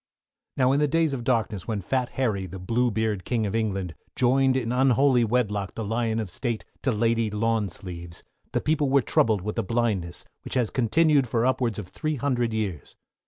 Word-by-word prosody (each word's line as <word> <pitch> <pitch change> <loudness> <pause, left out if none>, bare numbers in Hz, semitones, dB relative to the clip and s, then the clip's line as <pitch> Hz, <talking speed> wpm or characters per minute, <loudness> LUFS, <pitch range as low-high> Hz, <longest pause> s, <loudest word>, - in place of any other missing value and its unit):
Now 130 -1 +4
in 140 - +2
the 150 - +3
days 160 0 +1
of 125 -3 -3
darkness, 115 -6 0
when 110 -3 -1
Fat 125 +6 -1
Harry, 105 -8 -1
the 95 +2 -8
Bluebeard 110 0 0
King 115 -3 0
of 100 - -2
England, 95 -6 -1 0.2
joined 130 +1 +3
in 120 -3 -1
unholy 130 0 +4
wedlock 105 -4 0
the 115 - -3
Lion 115 +1 -1
of 105 -5 -4
State 115 +3 -3 0.2
to 130 - +1
Lady 115 0 +1
Lawn 110 0 0
Sleeves, 85 -2 -9 0.3
the - - 0
people 150 -2 +1
were 135 -1 +4
troubled 110 -4 +2
with 105 +3 -3
a - - +1
blindness, 100 -6 -1 0.2
which - - -5
has 125 -4 +1
continued 140 +3 +3
for 115 +1 +1
upwards 125 -4 +1
of 105 -4 -6
three 155 - -3
hundred 125 -4 0
years. 105 -8 -4
115 Hz, 190 wpm, -26 LUFS, 105-130 Hz, 0.3 s, Now